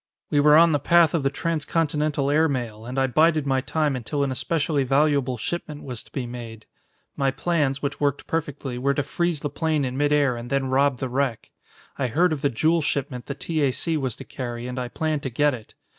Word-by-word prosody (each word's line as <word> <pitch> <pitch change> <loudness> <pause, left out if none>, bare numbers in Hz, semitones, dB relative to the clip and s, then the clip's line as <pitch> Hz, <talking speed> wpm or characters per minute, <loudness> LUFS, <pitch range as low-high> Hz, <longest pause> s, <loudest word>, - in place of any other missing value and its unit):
"We 145 - +3
were 150 +1 +6
on 165 0 +6
the 145 - +2
path 170 +2 +4
of 165 - +1
the 135 - +1
transcontinental 150 -2 -1
air 155 +2 +3
mail, 115 -4 -4
and 125 +2 -5
I 135 - +3
bided 155 +3 +3
my 135 -1 +1
time 150 0 0
until 140 +4 -2
an 140 - -1
especially 150 +1 0
valuable 135 -1 +2
shipment 150 +3 -5
was 125 -4 -6
to - - -22
be 130 -3 -3
made. 115 -2 -8 0.5
My 135 -1 +1
plans, 140 -1 0
which 145 0 -2
worked 145 -1 0
perfectly, 145 -5 -3
were 140 +2 +1
to 145 - 0
freeze 170 +1 -1
the 145 - -2
plane 155 -1 0
in 125 0 -3
midair 145 -3 +2
and 120 +1 -7
then 135 -1 0
rob 135 0 +3
the 130 - -3
wreck. 130 -3 -2 0.5
I 130 - +1
heard 165 +8 +2
of 145 - -4
the 140 - +2
jewel 160 +7 +2
shipment 135 -4 -3
the 140 - -4
T. 155 +2 -2
A. 140 -2 +3
C. 165 +5 -1
was 130 -6 -2
to - - -9
carry 120 -2 -6
and 125 +1 -4
I 125 - -3
planned 155 +3 -2
to 135 - -3
get 145 +4 +2
it. 115 -3 -10
140 Hz, 225 wpm, -24 LUFS, 130-155 Hz, 0.5 s, were